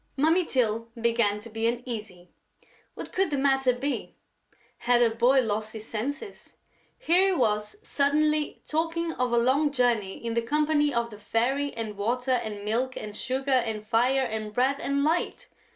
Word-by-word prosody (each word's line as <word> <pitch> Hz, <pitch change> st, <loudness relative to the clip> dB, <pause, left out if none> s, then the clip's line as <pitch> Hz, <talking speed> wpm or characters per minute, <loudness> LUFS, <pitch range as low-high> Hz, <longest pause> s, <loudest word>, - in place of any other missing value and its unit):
Mummy 325 Hz, +5 st, +3 dB
Tyl 230 Hz, -5 st, 0 dB
began 230 Hz, -3 st, +1 dB
to 230 Hz, -, -10 dB
be 225 Hz, +1 st, 0 dB
uneasy. 220 Hz, -7 st, -5 dB, 0.6 s
What -, -, -8 dB
could 385 Hz, -1 st, +1 dB
the 290 Hz, -, -1 dB
matter 270 Hz, -1 st, +3 dB
be? 270 Hz, +3 st, -3 dB, 0.6 s
Had 240 Hz, 0 st, +3 dB
her 230 Hz, -1 st, +2 dB
boy 250 Hz, +4 st, +4 dB
lost 215 Hz, -1 st, -2 dB
his 220 Hz, 0 st, -8 dB
senses? 285 Hz, -, -5 dB, 0.4 s
Here 360 Hz, +4 st, +3 dB
he -, -, +2 dB
was 210 Hz, -, 0 dB
suddenly 300 Hz, +1 st, +1 dB
talking 330 Hz, +1 st, -1 dB
of 250 Hz, -1 st, -1 dB
a 240 Hz, -, +2 dB
long 265 Hz, +5 st, +3 dB
journey 240 Hz, -7 st, +1 dB
in 230 Hz, -1 st, -4 dB
the 235 Hz, -, +1 dB
company 295 Hz, +3 st, +1 dB
of 235 Hz, -2 st, -1 dB
the 210 Hz, -, -11 dB
Fairy 260 Hz, +7 st, 0 dB
and 220 Hz, -3 st, -5 dB
Water 245 Hz, +5 st, -1 dB
and 215 Hz, -5 st, -2 dB
Milk 245 Hz, +4 st, -1 dB
and 210 Hz, -1 st, -7 dB
Sugar 265 Hz, +4 st, -2 dB
and 225 Hz, -5 st, 0 dB
Fire 250 Hz, +4 st, +2 dB
and 220 Hz, -2 st, -4 dB
Bread 265 Hz, +5 st, +1 dB
and 280 Hz, 0 st, 0 dB
Light! 325 Hz, +4 st, -1 dB
245 Hz, 170 wpm, -27 LUFS, 225-280 Hz, 0.6 s, boy